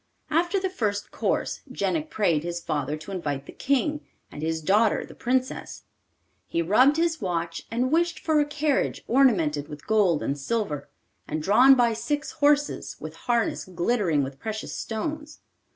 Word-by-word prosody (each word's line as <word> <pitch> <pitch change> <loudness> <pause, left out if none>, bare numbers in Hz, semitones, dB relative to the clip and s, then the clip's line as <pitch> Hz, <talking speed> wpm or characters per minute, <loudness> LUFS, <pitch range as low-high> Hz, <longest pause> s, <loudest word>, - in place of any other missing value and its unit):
After 345 +5 +2
the 380 - -1
first 210 - -2
course - - -1
Jenik 315 -1 -1
prayed 175 - +1
his 175 0 -3
father 150 -2 -2
to 155 +6 -10
invite 145 -7 -3
the - - -10
King, 280 +2 0 0.3
and 145 - -8
his 160 +1 -1
daughter 210 +6 +3
the - - -13
Princess. 255 +2 -2 0.6
He 170 - 0
rubbed 255 - +4
his 330 -2 +1
watch 170 -3 -3
and 250 +3 0
wished 340 +1 +2
for 315 -2 +1
a 295 - +3
carriage 295 -1 0
ornamented 170 - +3
with 150 -1 -10
gold 200 -8 +2
and 140 +1 -2
silver, 175 -2 -2 0.4
and 155 0 -3
drawn 250 +9 +7
by 240 -2 +3
six 290 +7 -2
horses, 290 -1 +1
with - - -8
harness 235 -2 0
glittering 175 - +1
with 135 0 -6
precious 220 +3 -5
stones. 300 +7 -4
220 Hz, 160 wpm, -26 LUFS, -, 0.6 s, drawn